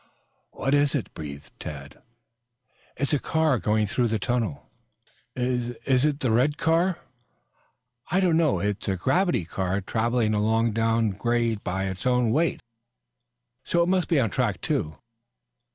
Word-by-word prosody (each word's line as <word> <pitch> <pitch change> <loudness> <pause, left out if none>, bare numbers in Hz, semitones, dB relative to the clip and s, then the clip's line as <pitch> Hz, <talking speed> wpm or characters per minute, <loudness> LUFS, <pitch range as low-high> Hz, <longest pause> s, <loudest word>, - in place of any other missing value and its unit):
"What 135 - -2
is 145 0 +3
it?" 135 - -3
breathed 70 -3 -8
Tad. 70 -1 -8 1.0
"It's 140 +3 -1
a 145 - +3
car 160 -5 +1
going 105 +3 +1
through 120 +4 0
the 110 0 0
tunnel." 110 - -2 0.7
"Is 125 -1 -1
is 130 0 +3
it 150 -1 0
the 125 - +1
red 130 +6 +2
car?" 165 +2 +2 1.1
"I 185 - +2
don't 180 -4 +3
know. 160 - +3
It's 100 +2 -2
a 95 - +1
gravity 155 - +1
car 95 +2 -2
traveling 110 +2 0
along 110 +2 +2
down 115 0 +1
grade 115 +1 -1
by 95 +2 -2
its 95 +4 -3
own 125 -2 +2
weight, 155 +3 +1 1.0
so 170 0 +2
it 170 - 0
must 185 -2 +1
be 160 - +3
on 115 -6 +1
track - - 0
two." 80 +1 -2
120 Hz, 150 wpm, -25 LUFS, 105-145 Hz, 1.1 s, is